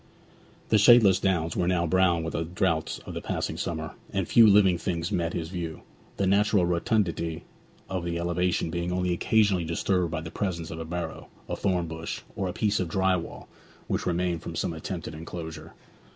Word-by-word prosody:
The 110 Hz, -, +5 dB
shadeless 105 Hz, -4 st, +7 dB
downs 85 Hz, -5 st, 0 dB
were 90 Hz, -, 0 dB
now 90 Hz, -2 st, +2 dB
brown 90 Hz, -1 st, +3 dB
with 80 Hz, -, -3 dB
the 80 Hz, -, -1 dB
droughts 85 Hz, -1 st, -1 dB
of -, -, -7 dB
the -, -, -4 dB
passing -, -, -3 dB
summer, -, -, -4 dB, 0.2 s
and 95 Hz, -2 st, -1 dB
few 115 Hz, -2 st, +7 dB
living 100 Hz, -4 st, +5 dB
things 85 Hz, 0 st, -2 dB
met 85 Hz, -1 st, -1 dB
his 80 Hz, -1 st, -3 dB
view, 85 Hz, -3 st, -5 dB, 0.3 s
the 100 Hz, -, +1 dB
natural 100 Hz, -1 st, +3 dB
rotundity 85 Hz, -3 st, 0 dB, 0.4 s
of 95 Hz, -2 st, -3 dB
the 85 Hz, 0 st, -2 dB
elevation 85 Hz, -1 st, 0 dB
being 85 Hz, +1 st, -2 dB
only 90 Hz, 0 st, 0 dB
occasionally 100 Hz, -1 st, +2 dB
disturbed 85 Hz, +2 st, 0 dB
by 80 Hz, 0 st, -3 dB
the 80 Hz, 0 st, -8 dB
presence 85 Hz, -5 st, -3 dB
of 80 Hz, -, -6 dB
a 80 Hz, -, -5 dB
barrow, 85 Hz, 0 st, -5 dB, 0.2 s
a -, -, -2 dB
thorn 90 Hz, -3 st, 0 dB
bush, 80 Hz, 0 st, -5 dB
or 95 Hz, -, -2 dB
a -, -, -2 dB
piece 105 Hz, +2 st, 0 dB
of 90 Hz, -, -1 dB
dry 95 Hz, +1 st, +2 dB
wall 85 Hz, -, -6 dB, 0.4 s
which -, -, -2 dB
remained 90 Hz, -1 st, 0 dB
from -, -, -7 dB
some -, -, -1 dB
attempted 80 Hz, -1 st, -5 dB
enclosure. 80 Hz, +1 st, -8 dB
90 Hz, 190 wpm, -27 LUFS, 85-95 Hz, 0.4 s, shadeless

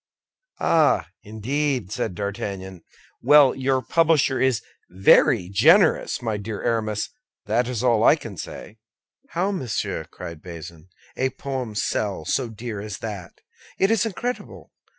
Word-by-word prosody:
"Ah, 155 Hz, -, +3 dB
indeed," 125 Hz, +1 st, -2 dB
said 90 Hz, -, -3 dB
D'Artagnan. 95 Hz, -2 st, -5 dB, 0.4 s
"Well, 145 Hz, 0 st, +6 dB
your 130 Hz, -1 st, 0 dB
publisher 150 Hz, -2 st, +2 dB
is 130 Hz, -4 st, +2 dB, 0.3 s
very 90 Hz, -1 st, +4 dB
generous, 155 Hz, -, +4 dB
my 110 Hz, -3 st, -1 dB
dear 105 Hz, +1 st, -6 dB
Aramis, 110 Hz, -3 st, -1 dB, 0.3 s
that's 120 Hz, +2 st, 0 dB
all 115 Hz, -3 st, +3 dB
I -, -, +7 dB
can 115 Hz, -10 st, -9 dB
say." 105 Hz, +5 st, -9 dB, 0.6 s
"How, 190 Hz, +3 st, +1 dB
monsieur?" 130 Hz, -, -3 dB
cried 85 Hz, -2 st, -9 dB
Bazin, 85 Hz, -1 st, -10 dB, 0.3 s
"a 130 Hz, -, 0 dB
poem 130 Hz, -5 st, -5 dB
sell 100 Hz, -4 st, -1 dB
so 125 Hz, -, 0 dB
dear 115 Hz, -1 st, -6 dB
as 105 Hz, -1 st, -6 dB
that! 100 Hz, -6 st, -8 dB, 0.4 s
It 195 Hz, +3 st, +3 dB
is 225 Hz, -4 st, +3 dB
incredible! 240 Hz, +3 st, -5 dB
115 Hz, 130 wpm, -23 LUFS, 100-135 Hz, 0.6 s, I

